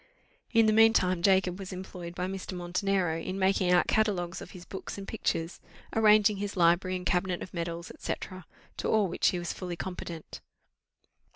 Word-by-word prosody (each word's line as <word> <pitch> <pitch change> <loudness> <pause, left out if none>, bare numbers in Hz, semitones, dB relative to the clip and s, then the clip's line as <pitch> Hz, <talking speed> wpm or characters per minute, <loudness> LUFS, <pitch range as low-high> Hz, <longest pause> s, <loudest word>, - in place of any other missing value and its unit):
In 230 -2 +5
the 215 - +4
mean 225 +1 +6
time 185 -4 +2
Jacob 190 -1 +3
was 195 -1 -7
employed 180 -2 -7
by 180 - -2
Mr. 190 0 -5
Montenero 180 -1 0
in 185 +3 -4
making 190 -1 +2
out 180 -1 +5
catalogues 190 -5 0
of - - -9
his 180 -1 -11
books 190 - -7
and 195 0 -7
pictures, 165 -6 -2 0.4
arranging 215 -1 +5
his 200 0 -4
library 175 +2 +3
and 180 0 -5
cabinet 180 0 0
of - - -11
medals, 170 -1 -4
&c., - - -2 0.6
to - - -2
all 215 -3 +3
which 175 - +1
he 180 - +2
was 175 -1 -3
fully 180 -2 -5
competent. 170 -2 -7
185 Hz, 180 wpm, -29 LUFS, 175-195 Hz, 0.6 s, mean